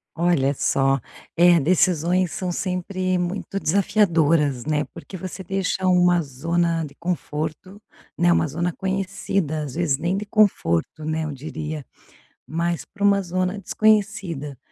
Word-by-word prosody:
Olha 165 -5 +2
só, 135 +1 +2 0.4
eh, 175 0 +6
decisões 175 +2 +2
são 185 -3 -3
sempre 185 +1 -1
muito 180 +2 -3
desafiadoras, 165 - +2
né. 150 -1 +1
Porque - - -10
você 185 +2 -7
deixa 190 0 -1
uma 180 -1 +4
zona 165 +4 -1
de 140 - -12
conforto, 170 +3 -4 0.4
né. 175 0 +4
Uma 170 - +3
zona 170 +4 -2
conhecida, 190 -4 -2
às 140 -4 -7
vezes 160 -5 +1
nem 170 +6 -1
de 210 - -4
conforto, 160 - +1
né, 155 +1 -1
eu 155 - -3
diria, 150 +1 -6 0.6
mas 170 +2 -2
pra 205 -1 -6
uma 200 -1 +4
zona 185 +2 -2
desconhecida. 200 - 0
175 Hz, 135 wpm, -23 LUFS, 155-185 Hz, 0.6 s, eh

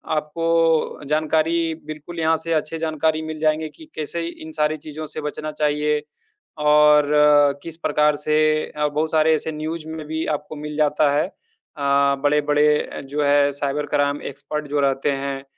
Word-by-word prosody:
आपको 165 +1 +1
जानकारी 160 +2 +1
बिल्कुल 155 +3 -8
यहाँ 160 0 +3
से 165 +1 -2
अच्छी 155 +1 -1
जानकारी 160 0 0
मिल 155 -1 -6
जाएँगी 155 0 +1
कि 320 - -13
कैसे 160 +2 -3
इन 160 -2 -9
सारी 155 0 0
चीज़ों 155 +1 -8
से 155 - -6
बचना 150 +1 -4
चाहिए 150 0 0 0.6
और 150 0 +5 0.6
किस 165 -1 -7
प्रकार 150 -2 +2
से 150 +1 -1 0.4
अ, 150 0 -1
बहुत 150 +2 -1
सारे 160 0 +4
ऐसे 160 - -3
न्यूज़ 155 +1 -5
में 160 -1 -6
भी 160 +1 -3
आपको 150 +1 -11
मिल 150 0 -6
जाता 150 -1 +3
है। 150 - +1
अ, 140 0 -1
बड़े-बड़े 150 0 +2
जो 145 +1 -1
है 145 0 +4
साइबर 145 +1 -2
क्राइम 145 0 0
एक्सपर्ट 150 +2 -6
जो 145 0 0
रहते 135 +1 +1
हैं 135 -1 -4
150 Hz, 160 wpm, -22 LUFS, 150-160 Hz, 0.6 s, और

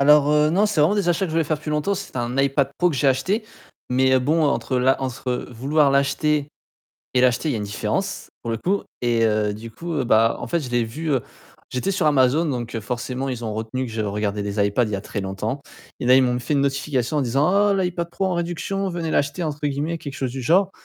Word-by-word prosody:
Alors, 145 +1 +6
heu, 150 0 +4
non, 195 +6 +3
c'est 210 -7 0
vraiment 155 +7 +4
des 195 -4 +1
achats 175 +3 +2
que - - -3
je - - -5
voulais 165 0 +2
faire 155 +1 0
depuis 150 0 -6
longtemps. 150 +7 0
C'est 195 -7 -7
un 120 +1 -2
iPad 135 0 +2
Pro 180 0 +3
que 145 - -3
j'ai 140 - +3
acheté 185 - 0 0.5
mais 130 +1 +4
bon 155 +6 +1
entre 125 -1 0
l'a 130 +2 +3
entre 130 -1 -3
vouloir 140 +5 +2
l'acheter 140 +2 +1 0.7
et 125 - +3
l'acheter 125 +4 +2
il - - +1
y - - -1
a - - -1
une 105 - -3
différence 100 - -3
pour 115 - -3
le 115 - -1
coup 195 - 0 0.2
et 120 -2 +2
heu, 105 -1 +1
du 115 +2 -8
coup, 155 +3 -3
bah, 115 -1 +3
en - - -5
fait 170 -1 0
je 130 - -6
l'ai 120 -1 +1
vu, 155 +7 -4
heu 135 -3 +2 0.5
j'étais 125 +10 -1
sur 185 - 0
Amazon 145 +2 +4
donc 120 -5 -3
forcément 125 +4 -4
ils 125 -2 -4
ont 110 -2 -3
retenu 110 +4 -3
que 115 - -7
je 110 - -5
regardais 105 0 -2
des 100 0 0
iPad 105 +4 +1
il 105 - -5
y - - +2
a 95 - -4
très 105 - -5
longtemps 95 +7 -3 0.4
et - - -3
là 125 +1 +6
ils 130 - +6
m'ont 125 -1 +1
fait 135 - -2
une 140 - +3
notification 140 0 0
en - - +2
disant: 135 +3 +1
«Ah, 205 0 +4
l'iPad 180 -3 -1
Pro 190 +2 -1
en 180 - -1
réduction, 175 +3 -2
"venez 170 -2 -3
l'acheter"» 145 +5 0
entre 150 -2 -2
guillemets, 145 +4 -2
quelque 140 -3 -7
chose 130 -3 -2
du 130 - -5
genre 185 +9 +3
135 Hz, 255 wpm, -22 LUFS, 120-160 Hz, 0.7 s, Alors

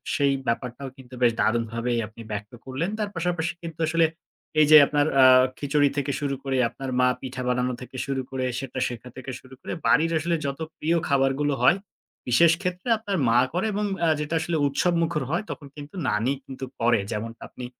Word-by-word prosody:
সেই 140 -1 +3
ব্যাপারটাও 125 +3 -2
কিন্তু 130 -1 -15
বেশ 120 -1 +5
দারুনভাবেই 115 +1 0
আপনি 110 +2 -13
ব্যক্ত 105 0 -5
করলেন। 135 +7 -2
তার 210 -1 -1
পাশাপাশি 170 -1 -1
কিন্তু 165 -2 -7
আসলে 165 +1 +3 0.5
এই 155 - +7
যে 155 - +12
আপনার 145 -1 +2 0.2
আ - - +9 0.3
খিচুড়ি 145 0 +2
থেকে 140 0 0
শুরু 140 -2 -1
করে, 135 -1 -1
আপনার 135 +2 -7
মা 125 - +5
পিঠা 130 -1 -5
বানানো 125 0 0
থেকে 125 +1 -10
শুরু 135 -1 -2
করে, 130 -1 -2
সেটা 130 -1 -5
শেখা 120 0 -7
থেকে 130 0 -7
শুরু 130 0 -15
করে, - - -5
বাড়ির 165 +2 +4
আসলে 170 +2 0
যত 140 +1 -3 0.2
প্রিয় 165 +2 +1
খাবারগুলো 140 +1 +2
হয়, 185 - +5 0.5
বিশেষ 160 +7 +5
ক্ষেত্রে 180 +3 -3
আপনার 205 -3 -3
মা 115 +1 +5
করে 180 +5 0
এবং 210 +1 -1 0.2
আ - - +3
যেটা 150 +2 -2
আসলে 165 +1 -1
উৎসবমুখর 165 +1 +1
হয় 170 - 0
তখন 145 - -8
কিন্তু 145 +3 -10
নানি 110 +5 +1
কিন্তু 130 -1 -7
করে 120 -1 +3
যেমনটা 115 +2 -5
আপনি 125 - -8
140 Hz, 190 wpm, -25 LUFS, 125-160 Hz, 0.5 s, যে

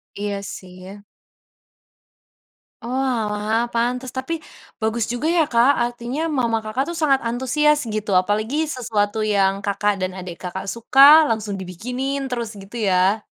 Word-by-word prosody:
Iya 200 -1 -3
sih 185 -2 -9
ya. 200 +2 -11 1.8
Oalah 230 -3 -1
pantes 245 +2 -1
tapi, 315 +5 -3 0.4
bagus 220 +1 0
juga 245 +6 -2
ya 335 -1 +3
Kak, 240 +3 +5
artinya 240 +4 -4
mama 235 -5 +1
Kakak 215 +5 -1
itu 340 - -4
sangat 270 -3 +3
antusias 290 +5 +2
gitu 215 -2 -3
apalagi 215 +7 -2 0.2
sesuatu 220 -3 -1
yang 200 -2 +2
Kakak 205 +1 +1
dan 185 0 -1
adik 180 -2 -7
Kakak 190 +2 -5
suka 275 +6 +7
langsung 215 -2 -2
dibikinin 250 +10 -4
terus 235 -3 -3
gitu 195 +4 -12
ya? 190 +4 +2
230 Hz, 135 wpm, -21 LUFS, 205-260 Hz, 1.8 s, suka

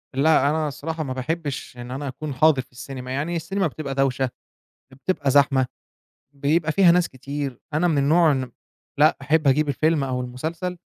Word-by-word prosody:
لأ، 140 0 +4
أنا 155 0 0
الصراحة 155 +3 -4
ما 130 -3 -4
باحبش 140 0 -4
إن 120 0 -8
أنا 140 +2 -4
أكون 140 +2 -5
حاضر 140 0 +4
في 130 - -20
السينما 130 +1 -8
يعني، 150 +6 -2
السينما 195 +3 -1
بتبقى 140 -2 -5
دوشة، 135 -1 +1 0.7
يا - - -14
بتبقى 140 -3 0
زحمة، 135 -2 +4 0.7
بيبقى 155 +3 +1
فيها 190 -1 +6
ناس 175 0 +2
كتير، 140 0 -5
أنا 175 +3 +2
من 155 -4 +1
النوع 155 +3 +4
إن 130 -3 -2 0.5
لأ 155 +2 +5
أحب 150 0 +2
أجيب 150 +3 +3
الفيلم 155 +1 +1
أو 130 -1 -2
المسلسل 160 +9 -4
145 Hz, 175 wpm, -23 LUFS, 130-160 Hz, 0.7 s, فيها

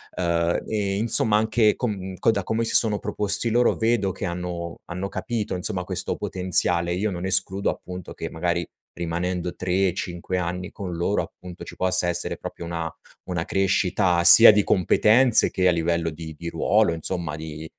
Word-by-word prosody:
uhm, 85 -1 -1
e 100 -2 -2
insomma, 110 0 +4
anche 110 0 +2
con 95 -6 -5
co 115 - +2
da 100 -3 -3
come 110 +3 -2
si - - +2
sono 105 -3 +5
proposti 105 +2 -1
loro, 120 +2 +2
vedo 110 -5 -1
che - - -9
hanno 85 -1 -5
hanno 90 +3 -6
capito, 110 -5 -4
insomma, 90 0 -3
questo - - -3
potenziale. 90 -1 -1
Io 100 +3 -2
non 90 0 -6
escludo 95 +1 +2
appunto 90 -1 -8
che, - - -7
magari, 85 0 -3 0.3
rimanendo 85 +1 -4
3-5 90 -1 -3
anni 90 +1 -4
con 90 -3 -7
loro, 95 +4 -1
appunto, 90 -1 -11
ci - - -12
possa 90 -1 0
essere 85 0 -2
proprio 85 - -9
una 85 -2 -5 0.4
una 85 -2 -3
crescita 95 -2 0
sia 115 +5 +12
di 105 -1 +1
competenze, 110 +6 +3
che 90 -1 +1
a - - +3
livello 85 0 -1
di 80 0 -9
di 85 0 -6
ruolo 105 +4 +1
insomma, 80 -1 -4
di 80 0 -9
90 Hz, 170 wpm, -23 LUFS, 85-105 Hz, 0.4 s, sia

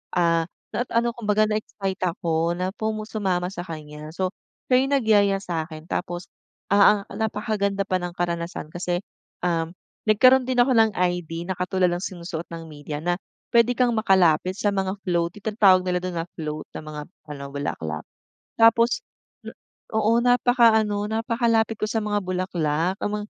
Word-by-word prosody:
Ah, 165 -2 +3 0.3
na 245 +4 0
ano 235 +1 +3
kung 235 - -8
baga, 215 +1 +4
na-excite 200 -3 -3
ako 165 -1 0
na 185 +1 -1 0.4
sumama 190 -5 -1
sa 175 - -5
kanya. 150 -2 -8
So, 185 0 0 0.4
siya 250 - +6
yung 280 - -1
nagyaya 205 -5 +3
sa'kin 160 -2 -4
tapos, 175 0 -3 0.4
ah 200 0 +6
ah, - - -10
napakaganda 205 -2 -1
pa 185 - +1
ng 175 -1 -4
karanasan 170 -2 -3
kasi, 175 0 -2 0.4
um 165 -1 0 0.3
nagkaroon 255 +5 +6
din 255 -1 -1
ako 245 +2 +5
ng 220 -1 +5
ID 175 -2 -1
na 190 - -1
katulad 180 0 +1
ng 175 - -2
sinusuot 170 -3 -5
ng 165 -1 -6
media 145 0 -6
na 175 +1 +1 0.4
puwede 235 +1 +5
kang 250 -1 +3
makalapit 185 -4 +3
sa 205 - +1
mga 190 0 -1
float, 170 0 0
tinatawag 205 -3 +4
nila 180 0 +1
dun 180 -1 -4
na 165 - -2
float 155 -2 -5
na - - -5
mga 155 -1 -7 0.3
ano, 145 -2 -6
bulaklak. 80 - -4 0.5
Tapos 230 +1 +5 0.4
n - - -6 0.4
oo, 220 +1 +3
napakaano, 230 -4 +4
napakalapit 225 0 +1
ko - - -3
sa 225 - 0
mga 210 -1 -1
bulaklak, 180 -2 -1
yung 205 - -1
ma 210 - -1
185 Hz, 160 wpm, -24 LUFS, 170-215 Hz, 0.5 s, siya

